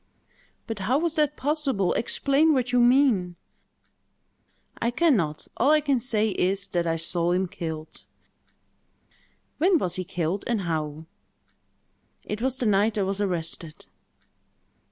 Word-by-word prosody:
"But 225 -3 -5
how 225 +8 +1
was 330 +1 0
that 300 -2 0
possible? 275 - 0
Explain 280 +6 +2
what 250 -1 0
you 250 - +3
mean!" 240 -8 +3 1.5
"I 235 - +2
can 295 +4 +3
not. 155 -6 -2
All 260 - +3
I 305 0 +5
can 285 -4 +1
say 220 -3 +1
is, 195 0 0
that 170 -1 -1
I 165 - +1
saw 170 +1 0
him 185 +1 0
killed." 160 -4 -7 1.6
"When 355 +3 +4
was 180 - -2
he 185 - -2
killed, 175 +2 -3
and 235 -4 0
how?" 155 -3 -3 1.2
"It 210 +1 -5
was 260 +1 0
the 250 - -2
night 210 +1 +2
I 200 - +1
was 195 +1 -2
arrested." 170 -4 -4
210 Hz, 140 wpm, -25 LUFS, 175-265 Hz, 1.6 s, I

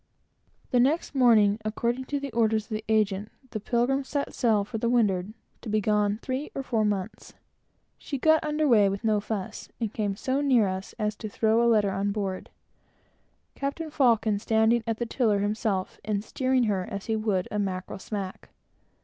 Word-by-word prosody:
The 250 - +3
next 285 +7 +2
morning, 220 -6 +4
according 235 +4 -1
to 285 +2 -2
the 275 -1 -5
orders 220 -1 +2
of - - -28
the 215 0 -3
agent, 210 -1 +1 0.2
the 215 - -3
Pilgrim 245 +5 +1
set 280 +1 -3
sail 220 -5 +2
for 220 +2 -5
the 235 - 0
windward, 205 -5 +1 0.3
to 230 - -7
be 215 +1 +2
gone 210 0 +1
three 260 +3 -3
or 275 - -3
four 230 -4 0
months. 205 -1 -3 0.6
She 280 - -4
got 315 +3 +4
under 305 0 0
weigh 210 -6 +5
with 195 0 -3
very 225 - +1
little 210 - +1
fuss, 205 -2 -5
and 225 -3 -2
came 205 -3 -1
so 265 +6 -1
near 250 -7 +4
us 190 +1 -5
as 210 -2 -1
to 215 - -6
throw 220 +2 +2
a 235 - +4
letter 210 -3 +3
on 195 +1 -1
board, 195 -2 -3 1.0
Captain 300 +3 -4
Faucon 225 -7 +2
standing 220 +2 +2
at 225 -1 -1
the 240 - -2
tiller 225 -3 +1
himself, 205 -2 -1
and 205 -1 -1
steering 255 +2 +1
her 200 -5 0
as 200 -1 -5
he 220 - 0
would 210 -4 0
a 210 - -1
mackerel 190 -1 -3
smack. 195 -2 -6
220 Hz, 190 wpm, -27 LUFS, 205-245 Hz, 1.0 s, weigh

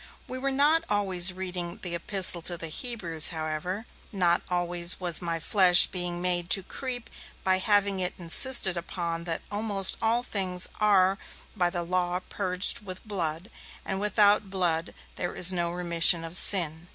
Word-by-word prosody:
We 255 - -8
were 275 +1 -3
not 295 +4 +1
always 190 -3 +3
reading 180 -2 -6
the 175 -2 -4
'Epistle 175 0 +4
to 175 +1 -1
the 165 -1 -7
Hebrews', 170 -6 0
however; 160 +6 -6 0.3
not 175 -4 0
always 175 -1 -2
was 175 -2 +7
my 170 -1 -4
flesh 180 +1 +5
being 175 -1 -4
made 175 -1 0
to 195 - -11
creep 245 +3 -7 0.4
by 185 0 +2
having 200 -1 +1
it 180 -1 -2
insisted 190 +3 +1
upon 170 -1 -6
that 165 -2 -4
'almost 205 -2 0
all 230 +2 -1
things 185 -6 -1
are 195 -2 +1 0.4
by 180 -4 -1
the 175 -1 -5
Law 180 0 -3
purged 185 0 0
with 185 +2 -9
blood, 175 -1 -4 0.3
and 190 0 -4
without 205 0 +2
blood 175 -4 -3 0.2
is 180 +1 +3
no 175 -1 -3
remission 170 -1 +2
of 165 +1 -4
sin'. 170 -4 +3
180 Hz, 155 wpm, -25 LUFS, 170-200 Hz, 0.4 s, was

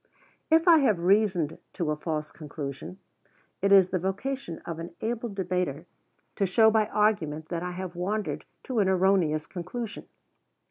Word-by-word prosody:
If 325 +2 +4
I 330 -2 +8
have 235 -9 +3
reasoned 180 -3 +2
to 160 -3 -1
a - - 0
false 150 -1 -4
conclusion, 150 +2 -7 0.6
it 195 +1 +2
is 190 -2 +6
the 185 - +1
vocation 195 +1 -3
of 165 -1 -5
an 170 +1 -8
able 235 +1 -2
debater 180 -6 -2 0.5
to 195 - +2
show 220 +4 +5
by 215 -1 +2
argument 160 -9 0
that 170 -2 -3
I 180 0 -4
have 185 -1 -6
wandered 200 +4 -2 0.2
to 255 -4 -2
an 195 -2 +3
erroneous 180 -5 +2
conclusion. 200 +6 -6
185 Hz, 155 wpm, -27 LUFS, 165-215 Hz, 0.6 s, I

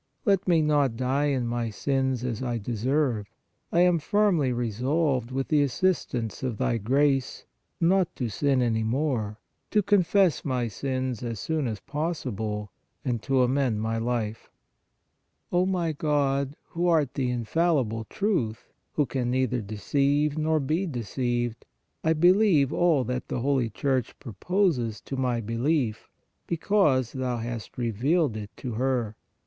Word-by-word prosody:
Let 195 -3 +2
me 165 -3 +4
not 145 -6 +2
die 130 +3 +1
in 130 -4 0
my 120 -1 -1
sins 130 +2 -1
as 120 -3 -3
I 120 -2 -1
deserve. 120 +1 0 0.4
I 170 - +3
am 180 -2 +4
firmly 185 -7 +2
resolved, 125 +3 0
with 135 +1 -3
the 150 -2 +4
assistance 135 - 0
of 125 -5 -2
Thy 115 - 0
grace, 135 +4 +1 0.3
not 180 +1 +2
to 125 - -2
sin 135 +3 +1
any 115 -2 +1
more, 115 -3 -1 0.3
to 210 -1 +2
confess 190 -3 +3
my 125 -4 -1
sins 130 +1 -3
as 115 -4 -4
soon 155 0 -1
as 110 -4 -4
possible 115 - -3 0.3
and 120 -4 -1
to 130 0 +2
amend 125 -4 +1
my 115 +1 -1
life. 115 -2 -2 1.0
O 180 +1 +2
my 175 -4 0
God, 140 -2 0
who 175 +1 -1
art 155 -6 +2
the 130 -3 -1
infallible 125 -2 0
Truth, 130 - -2 0.2
who 150 - +2
can 125 -1 -2
neither 125 -1 0
deceive 140 +8 0
nor 155 0 +1
be 155 +7 0
deceived, 120 - -2 0.4
I 160 - +3
believe 175 -3 +4
all 165 -6 +3
that 125 +1 -3
the 120 - -3
Holy 130 -3 +1
Church 130 +4 -1
proposes 125 - 0
to 135 - -6
my 125 -3 0
belief, 115 +1 -1 0.4
be 170 - -1
cause 150 - +2
Thou 130 -2 -2
hast 115 -1 -6
revealed 125 - +1
it 105 -2 -6
to 125 - -5
her. 120 -2 -1
130 Hz, 145 wpm, -26 LUFS, 120-155 Hz, 1.0 s, me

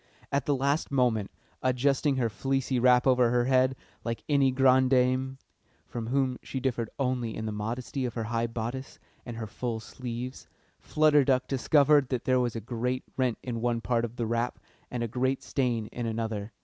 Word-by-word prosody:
At 140 -1 0
the 145 - +3
last 140 +4 0
moment, 120 -7 +1 0.3
adjusting 135 +3 +2
her 125 -3 +1
fleecy 135 +4 -1
wrap 125 0 +5
over 125 -2 +4
her 120 0 +2
head 130 0 +3 0.3
like 115 -1 -4
any 140 -3 +4
grande 130 0 +4
dame 130 +1 +2 0.5
(from 115 -2 -5
whom 130 0 0
she 135 - -5
differed 120 -4 -1
only 125 -4 -1
in 110 - -4
the 110 - -2
modesty 120 +6 -3
of 120 - -4
her 115 - -2
high 115 +1 -1
bodice 120 +3 -5 0.3
and 120 -1 -6
her 115 - -4
full 115 +2 -4
sleeves), 125 +2 -6 0.3
Flutter 150 -2 +4
Duck 130 -1 +2
discovered 140 +1 +4
that 125 -3 -2
there 130 0 +3
was 120 -2 0
a 115 - -3
great 125 +3 -2
rent 130 -3 0
in 120 -3 -4
one 120 -1 +1
part 120 0 0
of 120 0 -4
the 120 - -2
wrap 115 +2 -1 0.3
and 120 -1 -3
a - - -1
great 130 +3 -1
stain 120 -5 0
in 120 -1 -4
another. 110 -2 -3
125 Hz, 190 wpm, -28 LUFS, 115-130 Hz, 0.5 s, wrap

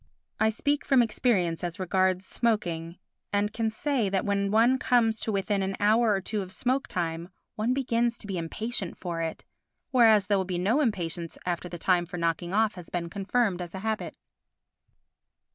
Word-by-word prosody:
I 220 - +4
speak 285 +6 0
from 265 -4 +4
experience 195 -8 0
as 175 +2 -4
regards 185 0 +1
smoking 175 -8 -1 0.3
and 205 +1 0
can 225 -1 0
say 235 -1 0
that 190 -1 0
when 200 -1 +1
one 235 +5 +4
comes 225 -3 +2
to 220 - -1
within 200 0 0
an 190 0 -1
hour 220 +3 +4
or 195 -2 +1
two 210 +2 -3
of 185 -1 -7
smoke 260 +6 -1
time 170 -1 -3 0.2
one 230 +4 0
begins 240 -3 +1
to - - -9
be 195 -3 -3
impatient 195 +3 -4
for 170 -2 -4
it, 160 -1 -4 0.5
whereas 225 -5 +6
there 200 +1 +2
will 190 - -1
be 180 -1 -3
no 215 +11 +2
impatience 170 - -2
after 180 0 -2
the 175 - -6
time 175 0 +2
for 180 - -6
knocking 170 0 -1
off 215 +1 +2
has 180 -2 -10
been 170 -1 -3
confirmed 200 -1 0
as 175 +1 -7
a - - -4
habit. 220 0 -2
200 Hz, 185 wpm, -27 LUFS, 180-225 Hz, 0.5 s, whereas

